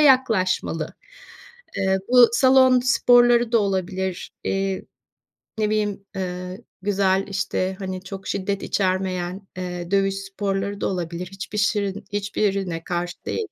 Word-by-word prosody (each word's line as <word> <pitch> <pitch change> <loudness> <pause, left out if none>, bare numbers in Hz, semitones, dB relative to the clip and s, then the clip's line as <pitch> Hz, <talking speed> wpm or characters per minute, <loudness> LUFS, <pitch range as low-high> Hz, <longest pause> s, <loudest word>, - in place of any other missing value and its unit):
yaklaşmalı. 220 - +2 0.8
Eee, 190 0 +2
bu 245 -1 +8
salon 260 0 +5
sporları 240 -1 +4
da 230 - +6
olabilir. 190 -2 -2
Eee, 195 0 -1 0.8
ne 210 -1 +2
bileyim, 205 -2 -1
eee, 180 +1 -4 0.2
güzel 195 -1 +2
işte, 190 -1 -1
hani, 185 -1 -5
çok 190 0 -8
şiddet 200 +1 -2
içermeyen, 185 0 -1
eee, 180 -1 -5
dövüş 195 -1 +2
sporları 195 0 -3
da - - +1
olabilir. 175 -1 -3
Hiçbir 195 +2 -6
şirin 205 -1 0
hiçbirine 195 -4 -1
karşı 175 0 -3
değilim. 445 - -2
195 Hz, 120 wpm, -23 LUFS, 185-210 Hz, 0.8 s, bu